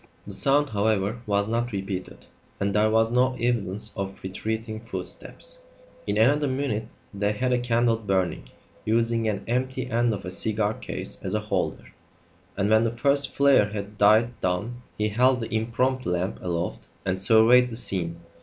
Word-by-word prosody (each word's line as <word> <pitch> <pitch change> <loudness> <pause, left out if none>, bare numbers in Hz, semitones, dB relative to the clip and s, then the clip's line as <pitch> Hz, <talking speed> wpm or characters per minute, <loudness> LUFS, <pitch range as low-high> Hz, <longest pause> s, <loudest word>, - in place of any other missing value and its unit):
The - - -8
sound, 145 +1 +2
however, 105 +1 0
was 100 0 +1
not 120 +2 -1
repeated; 95 -2 -5 0.3
and 100 0 0
there 105 +1 +3
was 115 +1 +2
no 130 +1 +2
evidence 110 -4 -1
of 100 -1 -4
retreating 110 +3 -4
footsteps. - - -6 0.5
In 100 0 0
another 145 +7 +4
minute 130 -5 -2 0.3
they 100 +1 0
had 125 +4 0
a 125 - +2
candle 120 -1 +2
burning, 95 - -1 0.3
using 115 0 +1
an 105 - -3
empty 130 +2 -2
end 120 +1 +2
of 100 -3 -4
a 90 - -4
cigar 105 +2 +1
case - - -4
as - - -2
a - - +2
holder; - - -3 0.6
and 100 0 +1
when 110 +1 +4
the 115 - +2
first 140 +2 +2
flare 140 -7 +5
had 105 0 -6
died 110 +3 +4
down 105 +7 -2 0.2
he 105 0 0
held 125 +4 +3
the 115 -1 -5
impromptu 120 +1 0
lamp 90 +3 -2
aloft 85 -1 -3 0.2
and 95 0 -1
surveyed 120 +3 +6
the 115 - -6
scene. 85 -7 -3
110 Hz, 165 wpm, -25 LUFS, 100-120 Hz, 0.6 s, surveyed